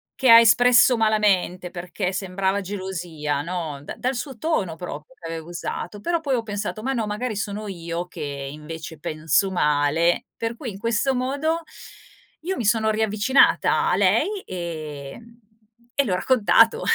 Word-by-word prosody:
che 260 -3 +2
ha 230 - +11
espresso 245 +2 +6
malamente 200 -5 +1
perché 180 +2 -4
sembrava 190 +1 -1
gelosia, 175 -7 -4
no? 165 -5 -4
Da - - -7
dal 255 +1 -2
suo 255 -2 -6
tono 205 - -1
proprio, 160 - -8
che 165 - -8
aveva 165 0 -6
usato, 175 +4 -5
però 340 +4 0
poi 285 -4 -2
ho 235 - +1
pensato: 210 0 -4
"Ma 270 +3 -1
no, 230 -4 -1
magari 210 +2 -3
sono 205 +1 -4
io 170 -1 -5
che - - -10 0.3
invece 160 +1 -8
penso 160 +6 0
male. 150 +1 +2
Per 230 0 -3
cui 245 -7 -5
in 195 - -10
questo 230 +4 +1
modo 285 +6 -1 0.8
io 375 +4 -3
mi 230 - -3
sono 220 +1 +3
riavvicinata 215 +4 +3
a - - +3
lei, 405 -1 +2
ehm, 170 - -7 0.5
e 280 - +2
le 205 - -2
ho - - +2
raccontato 260 - +4
205 Hz, 160 wpm, -23 LUFS, 170-235 Hz, 0.8 s, ha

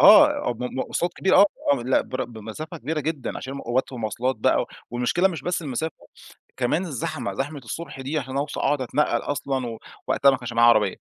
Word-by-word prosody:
آه، 125 - +7
م - - -2
م 125 - -4
مواصلات 170 +6 -1
كبيرة، 190 - +3
آه، 200 - +8 0.3
آه، 135 -4 0
لأ، 130 +2 +3
بر 130 - -3
بمسافة 120 - -8
كبيرة 155 +1 -2
جدًا 150 -2 -3
عشان 135 - -6
م 140 - -5
أوقات 125 +3 -1
والمواصلات 125 +2 -1
بقى 110 - +3
و - - -6 0.2
والمشكلة 125 +10 +2
مش 165 -7 -5
بس 175 +1 -1
المسافة، 150 +2 -3 0.6
كمان 130 +7 +1
الزحمة، 135 -3 -3
زحمة 145 +2 -3
الصبح 135 +3 -7
دي 140 +4 -2
علشان 130 -1 -5
أوص 140 +2 -2
أقعد 145 0 +1
أتنقّل 140 +4 +1
أصلًا، 130 -5 -2 0.3
ووقتها 140 - +5
ما 135 - +1
كانش 120 -1 -6
معايا 120 0 +6
عربية، 105 -4 +4
135 Hz, 200 wpm, -24 LUFS, 120-155 Hz, 0.6 s, آه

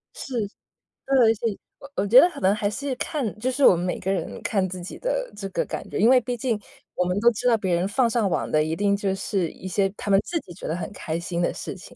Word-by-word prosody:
是， 265 - -7 0.7
对。 250 -5 +5
所 225 +2 -1
以， 200 - -7 0.2
我 275 +1 -12
我 200 +1 +1
觉 245 +5 +9
得 355 - +6
可 295 -5 -9
能 190 +2 +3
还 205 -1 0
是 265 +4 -3
看 250 -9 -3
就 255 +3 0
是 275 +1 +2
我 - - +8
们 175 +1 -2
每 180 - -2
个 190 - -1
人 195 - -3
看 195 -4 0
自 180 0 -7
己 175 - -8
的 - - -2
这 200 -1 -5
个 - - -1
感 - - -6
觉。 - - -4
因 225 +4 +5
为 260 -1 +7
毕 245 +1 -3
竟 230 -3 -1 0.4
我 180 - +1
们 180 +3 0
都 235 +2 +6
知 240 +3 -2
道 230 -2 +5
别 185 -4 0
人 175 +3 0
放 235 +3 +2
上 220 -4 +1
网 - - -1
的 155 0 +3
一 160 +1 -2
定 200 +2 +2
就 195 -1 -1
是 190 -3 -1
一 190 - -9
些 195 +1 +1
他 205 - -5
们 195 0 +6
自 340 - -2
己 175 - -12
觉 - - -8
得 160 - -1
很 180 - -5
开 165 -3 -4
心 170 0 -3
的 - - +1
事 - - -6
情。 - - -13
205 Hz, 305 characters per minute, -24 LUFS, 185-245 Hz, 0.7 s, 觉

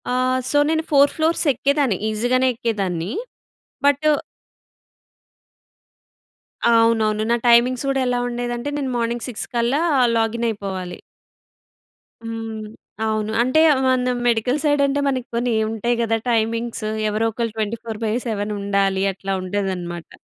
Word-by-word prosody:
ఆహ్, 255 0 +1
సో, 290 - +2
నేను 320 0 +1
4 285 0 +5
ఫ్లోర్స్ 320 +2 +1
ఎక్కేదాన్ని. 275 -4 +1
ఈజీగానే 245 +4 +1
ఎక్కేదాన్ని. 195 -6 -2 0.7
బటు 285 +2 +3 2.7
అవునవును. 220 -2 +3
నా - - +4
టైమింగ్స్ 240 +2 +4
కూడా 270 0 +1
ఎలా 245 0 0
ఉండేదంటే, 240 +2 -3
నేను 270 -3 -2
మార్నింగ్ 235 0 -2
6 235 - -5
కల్లా 240 +6 +1 0.4
లాగిన్ 225 +1 0
అయిపోవాలి. 190 -4 -5 1.2
హ్మ్. 225 -1 -5 0.4
అవును. 215 0 -1
అంటే 255 +6 +2 0.3
మన 255 -1 +2 0.2
మెడికల్ 240 +4 +1
సైడ్ 290 -1 +2
అంటే, 280 +1 0
మనకి 255 -3 -1
కొన్ని 240 0 0 0.2
ఉంటాయి 225 +2 -1
కదా! 225 -1 +1
టైమింగ్స్ 230 0 -1 0.2
ఎవరో 215 +2 0
ఒకళ్ళు 230 0 -3
24/7 220 0 -3
ఉండాలి. 195 -1 +1
అట్లా 195 +1 -4
ఉండేదన్నమాట. 185 -3 -4
230 Hz, 115 wpm, -21 LUFS, 215-255 Hz, 2.7 s, 4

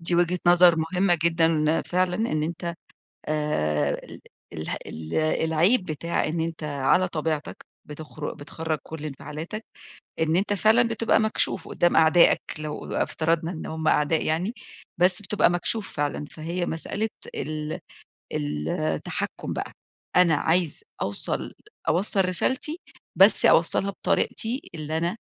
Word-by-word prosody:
دي 170 +1 0
وجهة 175 +1 +2
نظر 175 -1 +7
مهمة 175 +2 +2
جدًا. 165 -2 +2
فعلًا 180 0 0
إن 185 -9 -1
أنت 170 +1 -4 0.5
آآ 75 - 0
ال - - -12 0.3
اله 80 -2 -4
ال 80 0 -7
العيب 160 +7 +2
بتاع 170 +1 -2
إن 160 +2 -2
أنت 165 -1 -4
على 145 +5 +2
طبيعتك، 155 -2 -3 0.2
بتخر 150 0 -7
بتخرَّج 155 +1 -4
كل 155 -1 -8
انفعالاتك، 155 +8 -6 0.6
إن 160 +1 +2
أنت 200 +2 +1
فعلًا 220 +4 +4
بتبقى 225 -1 +2
مكشوف 215 -4 0
قُدّام 175 - +2
أعدائك 160 +2 +5 0.2
لو 155 -1 -5
ا - - +2
افترضنا 165 +1 0
إن 160 - -7
هم 160 0 -2
أعداء 150 +2 +2
يعني، 170 +7 0 0.5
بس 180 +3 +4
بتبقى 205 -1 +2
مكشوف 185 +4 -2
فعلًا، 145 0 -2
فهي 170 +3 -4
مسألة 200 +7 -2 0.3
ال 155 +1 -4 0.5
التحكُّم 75 +1 -3
بقى، - - -4 0.4
أنا 180 -3 +5
عايز 165 +1 0 0.2
أوصل 100 +1 -2 0.3
أوصَّل 195 +2 +3
رسالتي، 265 - +1 0.4
بس - - +7
أوصَّلها 200 - +3
بطريقتي 230 +6 -1
اللي 155 0 -3
أنا 170 +6 -1
165 Hz, 130 wpm, -25 LUFS, 155-180 Hz, 0.6 s, نظر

